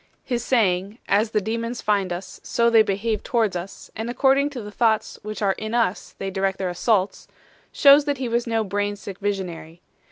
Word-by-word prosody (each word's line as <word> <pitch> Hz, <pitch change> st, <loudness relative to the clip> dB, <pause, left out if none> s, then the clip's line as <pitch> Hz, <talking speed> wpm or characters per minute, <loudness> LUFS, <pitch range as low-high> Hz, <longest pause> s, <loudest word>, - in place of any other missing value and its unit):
His 240 Hz, -3 st, -2 dB
saying 200 Hz, -3 st, +1 dB
"As 210 Hz, +2 st, +2 dB
the 215 Hz, -, +1 dB
demons 230 Hz, +3 st, -3 dB
find 200 Hz, -3 st, 0 dB
us, 180 Hz, +1 st, -6 dB
so 235 Hz, 0 st, +2 dB
they 225 Hz, -1 st, +7 dB
behave 215 Hz, +2 st, -1 dB
towards 220 Hz, -5 st, 0 dB
us, 175 Hz, +2 st, -7 dB
and 225 Hz, +2 st, -4 dB
according 270 Hz, +3 st, +3 dB
to 265 Hz, -4 st, -7 dB
the 210 Hz, -, -8 dB
thoughts 220 Hz, 0 st, 0 dB
which 215 Hz, 0 st, -5 dB
are 195 Hz, -, +3 dB
in 215 Hz, +3 st, -4 dB
us 225 Hz, -5 st, -1 dB
they 195 Hz, 0 st, -4 dB
direct 190 Hz, 0 st, -1 dB
their 190 Hz, -1 st, -2 dB
assaults" 195 Hz, +2 st, 0 dB, 0.4 s
shows 285 Hz, +1 st, +6 dB
that 285 Hz, -2 st, -1 dB
he 255 Hz, -1 st, -3 dB
was 235 Hz, +1 st, -1 dB
no 225 Hz, -1 st, +1 dB
brain 205 Hz, +1 st, -2 dB
sick 200 Hz, -1 st, -9 dB
visionary. 180 Hz, -5 st, -4 dB
215 Hz, 195 wpm, -23 LUFS, 195-235 Hz, 0.4 s, they